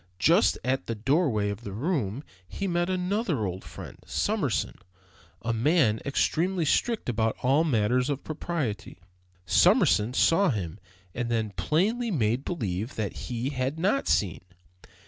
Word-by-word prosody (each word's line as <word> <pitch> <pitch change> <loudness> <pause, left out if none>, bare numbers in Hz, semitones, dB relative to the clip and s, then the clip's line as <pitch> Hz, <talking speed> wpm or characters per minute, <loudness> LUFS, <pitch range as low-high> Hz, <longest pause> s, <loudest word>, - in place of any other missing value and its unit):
Just 90 - +4
at 130 +2 -1
the 115 - -2
doorway 115 - +1
of 100 +2 -7
the 100 -4 -7
room 130 - -2 0.2
he 100 - -5
met 175 0 0
another 185 - -1
old 95 0 -4
friend, - - -10
Summerson, - - -1 0.6
a 115 - 0
man 115 -2 +2
extremely 170 +5 0
strict 230 - +1
about 115 -2 0
all 135 +5 +4
matters 125 -2 +1
of 140 -1 -2
propriety. 155 - -4 0.5
Summerson 105 +6 +4
saw 185 +7 +4
him 95 - -3 0.3
and 120 -1 -3
then 110 -3 -1
plainly 190 - 0
made 120 - 0
believe 110 - -3
that 105 -3 -3 0.2
he 120 +2 -2
had 135 +2 -2
not 200 +11 +1
seen. 95 -6 +1
130 Hz, 140 wpm, -27 LUFS, 110-165 Hz, 0.6 s, Just